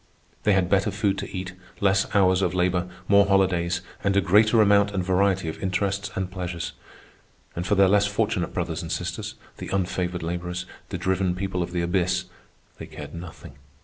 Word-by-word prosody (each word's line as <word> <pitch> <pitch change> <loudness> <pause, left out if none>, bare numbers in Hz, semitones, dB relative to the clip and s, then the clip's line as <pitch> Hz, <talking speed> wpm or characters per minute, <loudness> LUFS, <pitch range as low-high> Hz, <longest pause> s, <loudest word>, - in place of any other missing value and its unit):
They 105 - +5
had 95 -2 +2
better 95 +1 +2
food 100 -2 0
to - - -5
eat, 90 -1 -5 0.3
less 95 -1 +3
hours 95 -1 +4
of 90 -1 0
labor, 90 0 +1 0.2
more 100 0 +5
holidays, 90 -3 +2 0.2
and 100 0 +2
a - - +7
greater 105 +4 +4
amount 100 -1 +5
and 95 - 0
variety 95 -1 +1
of 80 - -5
interests 100 +2 -1
and 95 -1 -3
pleasures. 90 -2 -4 0.8
And 85 +1 -3
for 105 - +3
their 100 0 +5
less 100 +1 +4
fortunate 100 - -1
brothers - - -3
and - - -6
sisters, - - -4 0.2
the - - -7
unfavored 90 -2 -2
laborers, 90 +1 -3 0.2
the 95 - -3
driven 95 0 0
people 95 -1 -2
of 85 - -3
the 90 -1 -1
abyss, 90 0 0 0.5
they - - -7
cared - - -9
nothing. 85 -5 -10
95 Hz, 180 wpm, -25 LUFS, 90-100 Hz, 0.8 s, a